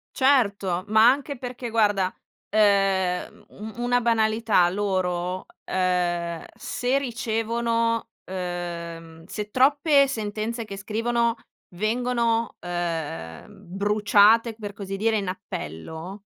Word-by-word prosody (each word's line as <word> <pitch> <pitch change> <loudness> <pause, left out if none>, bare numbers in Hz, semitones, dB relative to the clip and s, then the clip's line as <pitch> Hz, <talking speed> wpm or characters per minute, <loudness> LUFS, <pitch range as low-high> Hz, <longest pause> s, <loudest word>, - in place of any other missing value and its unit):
Certo, 200 -9 +2
ma 220 +2 +6
anche 280 0 -2
perché, 245 -1 -6
guarda, 205 -4 +2 0.4
uhm, 195 -2 +2
un 215 +2 -9
una 245 0 +2
banalità 220 -4 +3
loro, 185 -2 -1 0.2
uhm, 175 -2 0
se 250 +2 -1
ricevono 230 -2 -1 0.2
uhm, 170 -3 -6
se 210 +4 -5
troppe 280 +3 +4
sentenze 220 0 -3
che 200 -2 -7
scrivono 230 +3 0 0.4
vengono, 230 +3 0
uhm, 165 - -4 0.3
bruciate, 210 +3 +4
per 205 -2 -7
così 195 -1 -5
dire, 220 +2 +2
in 200 -3 -2
appello, 175 - -7
210 Hz, 100 wpm, -25 LUFS, 180-230 Hz, 0.4 s, ma